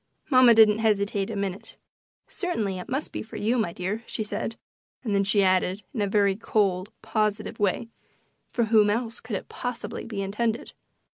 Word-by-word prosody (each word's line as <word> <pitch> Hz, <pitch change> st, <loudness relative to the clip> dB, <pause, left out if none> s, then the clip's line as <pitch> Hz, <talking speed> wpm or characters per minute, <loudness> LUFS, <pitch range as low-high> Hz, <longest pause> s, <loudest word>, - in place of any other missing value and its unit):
Mamma 255 Hz, -3 st, +7 dB
didn't 220 Hz, -1 st, +6 dB
hesitate 205 Hz, -2 st, +1 dB
a 225 Hz, -, -4 dB
minute. 200 Hz, -1 st, -4 dB, 0.5 s
"Certainly 220 Hz, -, -2 dB
it 180 Hz, -, -8 dB
must 270 Hz, +4 st, -2 dB
be -, -, -4 dB
for 220 Hz, -, -10 dB
you, 235 Hz, +4 st, +1 dB
my 215 Hz, -6 st, 0 dB
dear," 190 Hz, +6 st, -3 dB
she 220 Hz, -, -3 dB
said, 210 Hz, +2 st, -4 dB, 0.5 s
and 220 Hz, -5 st, -1 dB
then 200 Hz, 0 st, +3 dB
she 200 Hz, +1 st, +3 dB
added, 185 Hz, +1 st, +2 dB
in 230 Hz, -, -2 dB
a 205 Hz, -, +1 dB
very 200 Hz, -1 st, +3 dB
cold, 195 Hz, -3 st, 0 dB
positive 215 Hz, -1 st, -1 dB
way, 205 Hz, +3 st, +1 dB, 0.6 s
"For 235 Hz, -, 0 dB
whom 215 Hz, -2 st, +4 dB
else 230 Hz, +2 st, -1 dB
could 225 Hz, -2 st, -5 dB
it -, -, -5 dB
possibly 245 Hz, -1 st, -5 dB
be 205 Hz, -4 st, -3 dB
intended?" 220 Hz, +4 st, -2 dB
210 Hz, 180 wpm, -26 LUFS, 200-225 Hz, 0.6 s, Mamma